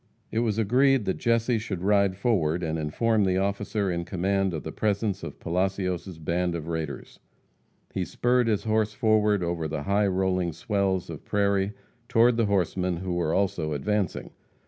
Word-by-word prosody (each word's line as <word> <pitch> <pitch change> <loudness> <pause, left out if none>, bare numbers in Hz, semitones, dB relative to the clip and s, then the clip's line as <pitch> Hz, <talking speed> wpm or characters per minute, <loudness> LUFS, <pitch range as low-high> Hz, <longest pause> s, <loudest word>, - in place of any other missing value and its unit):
It 110 - 0
was 110 -3 0
agreed 125 +3 +3
that 95 - -1
Jesse 115 0 +2
should 100 -5 -5
ride 100 -1 +3
forward 90 -7 +1
and 80 0 -1
inform 105 +8 +1
the 95 -1 +2
officer 100 0 -1
in 85 0 -2
command 95 +2 0
of 80 -3 -4
the 80 - -5
presence 100 -1 -1
of - - -8
Palacios' 90 0 -2
band 85 +2 -1
of 80 -2 -5
raiders. 80 -3 -5 0.7
He - - -1
spurred 125 0 +1
his 105 -3 +1
horse 110 -1 +1
forward 105 -3 +2
over 85 -2 -2
the 75 -1 -4
high 100 +3 +2
rolling 90 -2 0
swells 95 +1 -1
of 75 - -8
prairie 100 -1 +1 0.4
toward 115 +1 +4
the 115 -2 +1
horsemen, 90 -2 0
who 90 +1 -3
were 85 -2 0
also 90 -5 0
advancing. 100 +5 -2
95 Hz, 170 wpm, -26 LUFS, 85-105 Hz, 0.7 s, toward